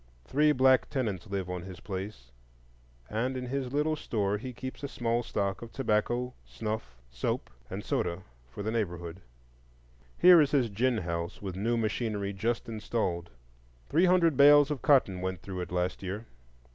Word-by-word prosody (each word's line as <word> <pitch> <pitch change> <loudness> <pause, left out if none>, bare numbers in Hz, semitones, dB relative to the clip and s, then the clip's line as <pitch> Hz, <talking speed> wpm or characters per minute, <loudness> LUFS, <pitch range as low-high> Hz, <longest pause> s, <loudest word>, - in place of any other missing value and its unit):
Three 150 - +3
black 130 -2 +4
tenants 110 - -2
live 95 -2 -2
on 90 -1 -4
his 95 0 -9
place, 95 - -6 0.8
and 125 +5 -1
in 125 - -4
his 130 0 -3
little 150 +2 +1
store 105 -7 -1
he 130 +3 -6
keeps 130 +3 -7
a 140 - -3
small 120 -2 -1
stock 100 -4 -2
of 115 -1 -8
tobacco, 120 +1 0
snuff, 105 - -5
soap, - - -2 0.2
and - - -6
soda, 90 +2 -1 0.3
for 100 +12 -7
the 110 - -1
neighborhood. 90 -5 -3 1.0
Here 175 -2 +8
is 145 - +3
his 135 -5 +2
gin 120 +4 +1
house 85 -2 -3
with 95 -3 -5
new 115 +5 0
machinery 105 -2 -1
just 115 +4 -1
installed. 105 -6 -2 0.6
Three 165 +5 +4
hundred 175 -4 +4
bales 145 +1 +7
of 145 - -3
cotton 100 -11 +3
went 95 -2 -3
through 95 -2 -5
it 90 - -6
last 90 0 -1
year. 100 +4 -5
110 Hz, 165 wpm, -30 LUFS, 95-130 Hz, 1.0 s, Here